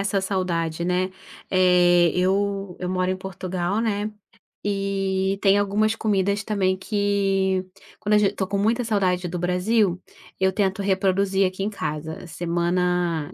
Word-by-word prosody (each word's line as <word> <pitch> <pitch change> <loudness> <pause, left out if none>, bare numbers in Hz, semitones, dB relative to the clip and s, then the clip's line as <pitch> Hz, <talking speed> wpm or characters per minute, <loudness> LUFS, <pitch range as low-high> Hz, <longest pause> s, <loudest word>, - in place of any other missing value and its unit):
essa 195 0 0
saudade, 170 -4 -1
né, 180 +1 0 0.4
eh, 180 -2 +5
eu 195 +1 0
eu 180 - -3
moro 185 0 0
em 185 - -1
Portugal, 185 +1 -3
né, 210 -1 -1 0.5
eh, 195 -1 -1
tem 195 0 +4
algumas 210 +2 +1
comidas 200 -1 0
também 190 -4 0
que, 195 -2 0 0.3
quando 210 0 0
a - - +7
ge 205 -1 +3
tô 190 - -2
com 200 +1 -1
muita 230 +4 +1
saudade 190 -5 0
do 175 +1 -4
Brasil, 180 +2 +1 0.4
eu 190 0 +3
tento 195 -1 0
reproduzir 195 0 +2
aqui 185 +1 -4
em 205 - 0
casa, 160 -1 -5
semana 175 -1 -1
190 Hz, 145 wpm, -23 LUFS, 180-200 Hz, 0.5 s, a